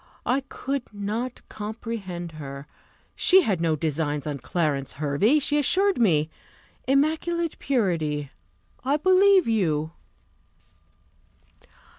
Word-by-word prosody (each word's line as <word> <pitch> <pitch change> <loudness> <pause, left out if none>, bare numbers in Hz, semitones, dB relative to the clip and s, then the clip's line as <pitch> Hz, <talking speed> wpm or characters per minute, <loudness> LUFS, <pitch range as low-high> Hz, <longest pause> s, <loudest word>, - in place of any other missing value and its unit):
I 255 +2 +2
could 275 -2 -4
not 215 +5 -4
comprehend 210 -5 -6
her; 140 -3 -8 0.5
she 380 +1 +5
had 190 - 0
no 165 -2 +2
designs 150 -2 -2
on 145 -2 -3
Clarence 145 -6 -1
Hervey, 150 - +2
she 295 0 +1
assured 385 +6 +2
me. 160 -9 +3 0.6
Immaculate 320 +4 +1
purity! 160 - -1 0.5
I 275 +3 +2
believe 375 +1 +5
you. 160 -9 0
205 Hz, 100 wpm, -25 LUFS, -, 0.6 s, she